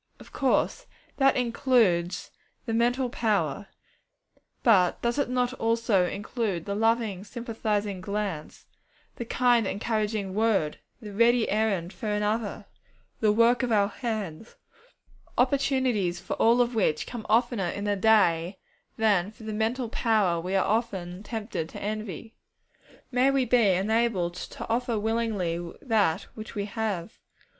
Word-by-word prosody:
Of - - -14
course, - - 0 0.3
that 270 -1 +4
includes 230 -8 +1 0.3
the 230 - -2
mental 245 +3 +2
power, 205 - -1 1.0
but 190 -7 +4
does 235 +3 0
it 285 - 0
not 250 0 0
also 225 -6 +1
include 205 -3 -3
the 200 - -3
loving, 220 -2 0
sympathizing 215 -4 -3
glance, 200 -5 -4 0.5
the 235 - -4
kind, 240 -2 +2
encouraging 210 -1 -2
word, 205 -8 +1 0.2
the 210 -2 -8
ready 235 +2 +3
errand 200 -4 0
for 220 - -6
another, 210 0 -1 0.5
the 215 -2 +3
work 230 +3 +4
of 250 -2 -1
our 205 -2 +3
hands, 220 -5 -5 0.8
opportunities 255 -8 +1
for - - -5
all 235 +2 +4
of 245 0 0
which 160 -8 +1
come 240 -3 -7
oftener 225 -4 +2
in 200 - -4
the 205 0 +1
day 190 -4 +3 0.4
than 205 -4 +2
for 220 +2 -15
the 215 0 -5
mental 230 +4 -1
power 210 -7 +1
we 185 +3 -3
are 190 - +3
often 195 -5 -2
tempted 210 -7 -4
to - - -9
envy? 215 0 -5 0.8
May 255 +2 +3
we 275 -2 +2
be 235 -3 +4
enabled 195 -2 +1
to 180 - -7
offer 235 0 0
willingly 210 -6 -1 0.2
that 205 - +2
which 215 -1 -9
we 200 -1 -2
have. 215 -2 -4
220 Hz, 135 wpm, -27 LUFS, 195-235 Hz, 1.0 s, that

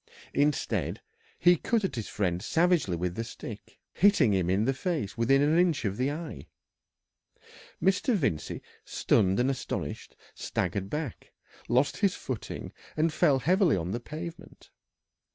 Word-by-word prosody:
Instead, 145 +1 0 0.4
he 175 0 +6
cut 220 +6 0
at 190 - -1
his 115 -4 -4
friend 90 -3 -1
savagely 165 - +2
with 90 +1 -2
the 115 - -3
stick, 115 -2 -9 0.2
hitting 195 - +4
him 90 -2 +1
in 100 +4 +2
the 135 - +2
face 150 - -2
within 135 +4 +3
an 155 +3 +3
inch 170 -8 +2
of 100 -1 -1
the 130 +2 +1
eye. 155 +2 -6 1.3
Mr. 195 +6 +2
Vincey, 130 - -2 0.2
stunned 95 +1 +2
and 130 +2 +3
astonished, 135 - -5 0.2
staggered 100 -1 -2
back, 150 -3 -5 0.4
lost 130 +4 +2
his 200 -4 +2
footing, 130 -5 -6 0.2
and 155 +1 +2
fell 140 -3 +4
heavily 175 - +3
on 85 +1 -3
the 120 - -2
pavement. 165 +6 -9
135 Hz, 145 wpm, -28 LUFS, 105-170 Hz, 1.3 s, he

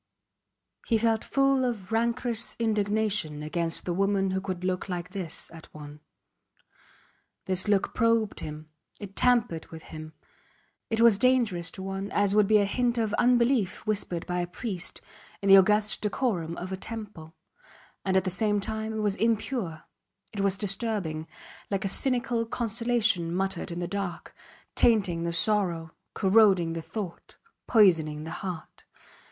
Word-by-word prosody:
He 230 - +3
felt 225 0 +1
full 275 -1 +2
of 225 -6 -3
rancorous 235 0 0
indignation 210 -7 0
against 165 +2 -2
the 175 - -1
woman 195 +1 +1
who 190 0 -1
could 185 -2 -5
look 185 +1 -2
like 180 0 -4
this 185 -5 -1
at 165 -1 -13
one. 150 0 -10 1.5
This 185 +1 0
look 200 -2 +1
probed 230 -3 +1
him; 155 0 -8 0.3
it 200 -1 -9
tampered 240 -10 +2
with 160 -1 -11
him. 155 0 -9 0.8
It 225 0 0
was 230 -4 +6
dangerous 230 -9 +2
to 190 - -7
one 195 +1 -4
as 205 -1 +2
would 210 -1 +4
be 215 +1 +5
a 205 - +3
hint 240 +4 0
of 220 -2 0
unbelief 240 -5 +2
whispered 200 -5 -1
by 180 0 -2
a 175 - -3
priest 180 -1 -4 0.4
in 200 - -1
the 195 - +10
august 210 +2 +3
decorum 200 -7 -1
of 185 +2 -6
a 190 - -3
temple; 200 -7 -8 0.7
and 190 -1 +1
at 190 - +2
the 185 - -1
same 205 +2 +1
time 220 +2 -3
it 220 - -2
was 205 -2 +1
impure, 225 - -1 0.5
it 205 - -5
was 195 -1 +1
disturbing, 195 -6 -1 0.4
like 195 -1 -1
a - - +2
cynical 245 +1 0
consolation 230 -6 +1
muttered 190 0 -2
in 170 - -5
the 175 0 -3
dark, 195 -4 -5 0.4
tainting 190 -7 +2
the 170 - -1
sorrow, 170 -3 +1 0.2
corroding 190 -4 +4
the 165 - -4
thought, 190 0 -7 0.3
poisoning 165 -9 +4
the 160 - -7
heart. 180 -4 -7
195 Hz, 155 wpm, -27 LUFS, 175-225 Hz, 1.5 s, the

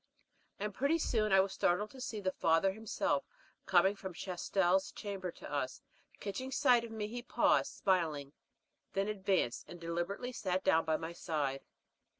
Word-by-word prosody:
And 210 0 -3
pretty 280 - +2
soon 220 -9 +1
I 190 0 +7
was 195 0 -2
startled 205 +5 +1
to 260 - -11
see 225 -3 -3
the 190 -2 0
father 165 +2 +3
himself 200 -2 -1 0.4
coming 190 +2 +5
from 190 -3 -7
Chastel's 185 +1 +1
chamber 195 -3 -5
to - - -9
us. 130 -3 -2 0.4
Catching 235 +7 -4
sight 250 -3 +4
of 235 - -6
me 220 -2 -3
he 240 +3 -5
paused, 240 - +2
smiling, 160 -7 0 0.6
then 195 +1 0
advanced, 190 - 0
and 175 - -9
deliberately 175 +8 -3
sat 185 -6 -1
down 165 -4 +4
by 160 -1 +2
my 165 +1 -5
side. 150 -6 -2
190 Hz, 160 wpm, -34 LUFS, 170-210 Hz, 0.6 s, I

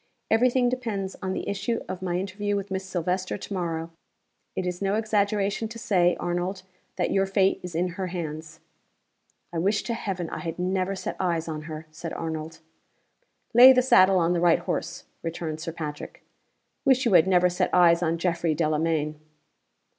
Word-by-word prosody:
Every 240 +3 +5
thing 250 0 +2
depends 225 -6 -3
on 190 0 -2
the - - -4
issue 200 +4 -2
of 185 - -5
my 180 -1 -1
interview 200 +2 -2
with 200 -1 -4
Miss 190 0 -2
Silvester 185 +1 -2
to 200 - -7
morrow. 165 -3 -3 0.6
It 185 - -2
is 180 0 -3
no 195 +1 +1
exaggeration 210 -1 0
to 230 +1 -9
say, 180 -6 +2
Arnold, 175 +2 -2 0.3
that - - -1
your 195 0 +2
fate 195 0 +2
is 180 -2 -7
in 180 +2 +1
her 185 +2 -4
hands." 160 -3 -6 0.9
"I 165 - -1
wish 200 +4 +1
to 235 - -2
heaven 190 -6 -3
I - - -4
had 165 -2 -5
never 185 +1 -1
set - - -5
eyes 170 -3 0
on 155 -1 -5
her!" 155 0 -6
said 160 +1 -7
Arnold. 160 0 -5 0.9
"Lay 250 +3 +10
the 255 -1 +3
saddle 190 -6 +6
on 170 0 +2
the 170 - 0
right 175 -1 +5
horse," - - -4 0.2
returned 165 -1 -4
Sir 165 - -4
Patrick. 150 -2 -7 0.6
"Wish 265 -2 +3
you 230 - +2
had 180 0 +6
never 180 -1 +4
set 180 0 0
eyes 170 -1 +5
on 165 -1 0
Geoffrey 170 -2 0
Delamayn." 155 -1 0
180 Hz, 180 wpm, -26 LUFS, 165-200 Hz, 0.9 s, Lay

